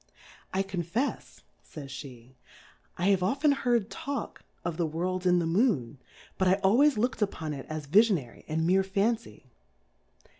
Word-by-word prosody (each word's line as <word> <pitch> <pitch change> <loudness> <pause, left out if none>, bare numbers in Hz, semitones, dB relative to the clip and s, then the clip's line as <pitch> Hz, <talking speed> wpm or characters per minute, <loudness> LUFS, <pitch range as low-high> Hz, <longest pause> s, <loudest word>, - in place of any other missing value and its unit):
I 190 +1 0
confefs, 195 - -3 0.3
Jays 135 -3 -7
fie, 130 -2 -13 0.6
I 180 +3 +1
have 195 -2 +3
often 275 +11 +2
heard 240 -6 +1
talk 280 0 -5 0.2
of 170 -2 -2
the 170 -2 0
IVorU 180 +3 -2
in 180 0 +5
the 170 - +1
Moo?^^ 165 - +1 0.4
but 190 - +3
I 185 - +5
always 260 +9 +5
lookM 225 +1 -1
upon 160 -7 -2
it 135 -2 -8
as 155 -1 -4
Viiionary 180 - +2
and 160 +1 -1
meer 185 +3 +4
Fancy. 200 - -2
185 Hz, 150 wpm, -28 LUFS, 155-220 Hz, 0.6 s, in